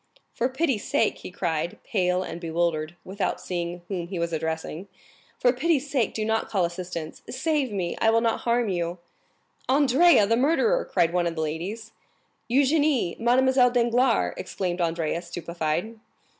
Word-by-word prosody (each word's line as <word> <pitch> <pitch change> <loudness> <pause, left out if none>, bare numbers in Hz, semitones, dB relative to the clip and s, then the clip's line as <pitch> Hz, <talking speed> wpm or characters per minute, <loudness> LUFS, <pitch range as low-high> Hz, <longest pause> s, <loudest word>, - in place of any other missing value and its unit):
"For 245 - 0
pity's 265 -5 0
sake," - - +1
he - - -8
cried, 170 -2 -2
pale 180 -2 0
and 170 -1 -7
bewildered, 165 -1 -1
without 190 0 -2
seeing 175 -1 -4
whom 180 -4 -4
he 185 0 -5
was 170 0 -2
addressing,—"for 160 +9 -3
pity's 290 +1 0
sake 250 -6 0
do 215 - -1
not 220 0 0
call 190 -5 +1
assistance! 175 -2 -6
Save 285 -1 0
me!—I 195 +3 0
will 225 0 +4
not 230 -1 +1
harm 235 0 +1
you." 175 -2 -2 0.7
"Andrea, 280 -1 +5
the 225 +3 +2
murderer!" 330 - +2
cried 170 0 +1
one 175 -1 +1
of 165 - -3
the 160 - -2
ladies. 185 +9 -4 0.6
"Eugénie! 280 - +2
Mademoiselle 250 +2 +4
Danglars!" 240 0 +2
exclaimed 180 -2 -3
Andrea, 165 0 -1
stupefied. 170 +4 -3
195 Hz, 145 wpm, -25 LUFS, 170-250 Hz, 0.7 s, Andrea